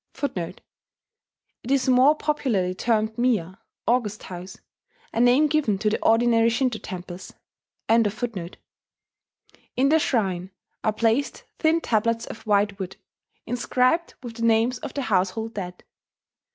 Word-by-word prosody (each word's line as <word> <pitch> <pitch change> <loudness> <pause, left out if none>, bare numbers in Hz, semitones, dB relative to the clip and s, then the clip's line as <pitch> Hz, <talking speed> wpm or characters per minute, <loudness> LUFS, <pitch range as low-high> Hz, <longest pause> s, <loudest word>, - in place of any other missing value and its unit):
[*It 245 - -4 1.1
is 275 -1 +2
more 260 +4 +5
popularly 240 -13 0
termed 220 +2 0
miya, 205 -7 0 0.3
"august 225 -4 0
house," 180 +1 -8 0.6
a - - -1
name 245 +5 +5
given 295 -9 +1
to 210 +2 0
the - - -1
ordinary 230 0 +4
Shinto 240 -1 0
temples.] 180 -1 -8 0.5
In 230 +1 +5
the 230 - -4
shrine 190 - 0 0.3
are 215 - +2
placed 230 +5 0 0.2
thin 320 +1 +3
tablets 230 -1 0
of 220 - -10
white 205 -1 +2
wood, 190 -1 -5 0.5
inscribed 255 +6 +1
with 235 -2 -8
the - - -7
names 230 +2 +2
of 295 -4 -7
the 280 - -1
household 220 +2 0
dead. 180 -3 -6
225 Hz, 125 wpm, -24 LUFS, 200-255 Hz, 1.1 s, more